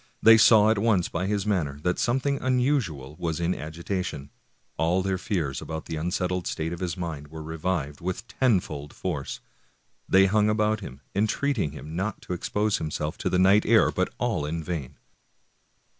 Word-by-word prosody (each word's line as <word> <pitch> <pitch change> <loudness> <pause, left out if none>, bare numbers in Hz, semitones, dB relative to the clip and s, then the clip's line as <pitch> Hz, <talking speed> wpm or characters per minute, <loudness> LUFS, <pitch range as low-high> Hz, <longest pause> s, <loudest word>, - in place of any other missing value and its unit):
They 115 0 +8
saw 110 -1 +6
at 110 - +1
once 100 -5 +2
by 95 - -2
his 100 -1 -1
manner 80 -9 -1
that 90 0 0
some 120 +2 +2
thing 140 +1 -1
unusual 125 - 0
was 80 -1 -2
in 85 +1 +1
agitation; 80 -2 -4 0.4
all 85 +4 +1
their 95 -1 -1
fears 80 -10 -2
about 80 -1 -6
the 80 - -4
unsettled 90 +2 -1
state 80 +2 -2
of 85 - -6
his 90 -1 -3
mind 80 -5 -5
were 80 +1 -8
revived 80 -2 -3
with 95 +5 -4
tenfold 90 - 0
force; 75 -7 -4 0.7
they 95 +1 +6
hung 105 +2 +3
about 105 0 +1
him, 70 -9 -9
entreating 110 - 0
him 75 +2 -8
not 100 +3 -2
to - - -4
expose 105 +4 0
himself 75 0 -3
to - - -1
the 90 - +1
night 95 +3 +5
air, - - +4
but - - -1
all - - -1
in 80 +2 -3
vain. 80 -7 -5
90 Hz, 175 wpm, -26 LUFS, 80-105 Hz, 0.7 s, They